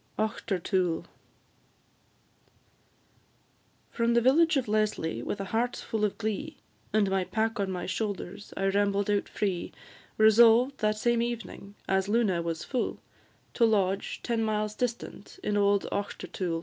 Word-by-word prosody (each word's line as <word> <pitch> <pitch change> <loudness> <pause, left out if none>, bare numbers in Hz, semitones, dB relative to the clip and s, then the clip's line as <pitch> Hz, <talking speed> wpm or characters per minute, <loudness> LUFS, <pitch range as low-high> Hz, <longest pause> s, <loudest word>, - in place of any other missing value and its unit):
AUCHTERTOOL. 185 -4 -1 2.9
From 235 0 +1
the - - +6
village 305 +5 +4
of 260 - -1
Leslie, 210 - 0
with 200 - -4
a 195 - -3
heart 240 +2 +1
full 220 -2 -3
of 210 - 0
glee, 230 +8 -3 0.3
And 215 -2 +3
my 190 -1 +1
pack 225 +3 -1
on 195 -1 0
my 180 -1 -3
shoulders, 200 -1 -4
I 195 - 0
rambled 200 0 +1
out 205 -1 0
free, 190 -4 -2 0.5
Resolved 230 +4 +6
that 215 -1 +1
same 235 +1 +2
evening, 235 -4 -5
as 190 +1 +1
Luna 210 -6 +2
was 165 -1 -3
full, 255 -3 -2 0.5
To 235 - +1
lodge, 200 -3 +1
ten 230 -2 0
miles 215 -1 -1
distant, 240 - -5
in 210 - 0
old 200 -1 +3
Auchtertool. 185 -4 -3
210 Hz, 135 wpm, -28 LUFS, 195-230 Hz, 2.9 s, the